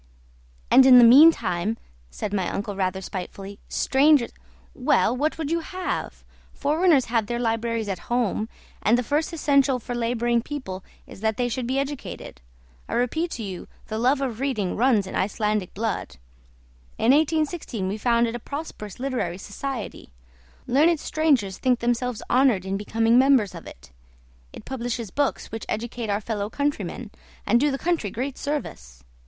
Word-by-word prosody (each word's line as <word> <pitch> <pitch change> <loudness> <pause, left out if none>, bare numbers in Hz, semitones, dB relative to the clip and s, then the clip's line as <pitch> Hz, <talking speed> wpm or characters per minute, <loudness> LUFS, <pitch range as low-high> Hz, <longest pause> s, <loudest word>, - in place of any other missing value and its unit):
"And 265 0 +8
in 255 -1 +9
the 245 - +9
meantime," 230 - +5 0.3
said 195 - -5
my 190 -3 0
uncle 205 0 -4
rather 190 0 -1
spitefully, 195 +2 -7
"strangers 275 -2 +3 0.3
" - - -30 0.2
"Well, - - +4
what 300 +5 -1
would 315 -2 -3
you 335 - +1
have? 365 +2 -5 0.3
Foreigners 300 -1 +2
have 225 -3 0
their 240 - -2
libraries 230 -1 -1
at 190 -3 -3
home, 230 -2 0 0.3
and 225 +3 +3
the 250 - 0
first 295 +7 0
essential 280 -4 +2
for 245 0 -6
labouring 235 0 0
people 225 -9 -6 0.2
is - - -13
that 220 -1 0
they 245 - +1
should 245 0 -3
be 260 +2 -1
educated. 275 0 -5 0.5
I - - -2
repeat 315 +8 0
to 230 - -5
you 190 -3 -6 0.2
the 220 0 -3
love 260 +4 +2
of 245 -5 -3
reading 250 -9 -1
runs 230 -4 +3
in 190 - -8
Icelandic 210 -1 -1
blood. 220 - -3 0.8
In 230 - +3
1816 305 - 0
we 205 +3 -3
founded 235 0 +2
a 240 - -4
prosperous 260 -7 -7
literary 250 -10 -2
society; 225 - -6 0.6
learned 310 +5 +3
strangers 275 -13 +1
think 255 -1 +2
themselves 240 0 -1
honoured 245 -7 +3
in 190 0 -2
becoming 225 +4 +2
members 260 -7 +4
of 170 - -10
it. 60 +1 -13 0.6
It - - -12
publishes 240 -5 -4
books 285 +4 -1
which 225 - -6
educate 230 0 -4
our 205 +1 0
fellow 210 -1 -3
countrymen, 245 -5 -3 0.3
and 235 +4 +4
do 295 +3 +3
the 270 - -2
country 330 -9 -1
great 260 +7 -4
service. 65 - -5
235 Hz, 160 wpm, -24 LUFS, 210-275 Hz, 0.8 s, in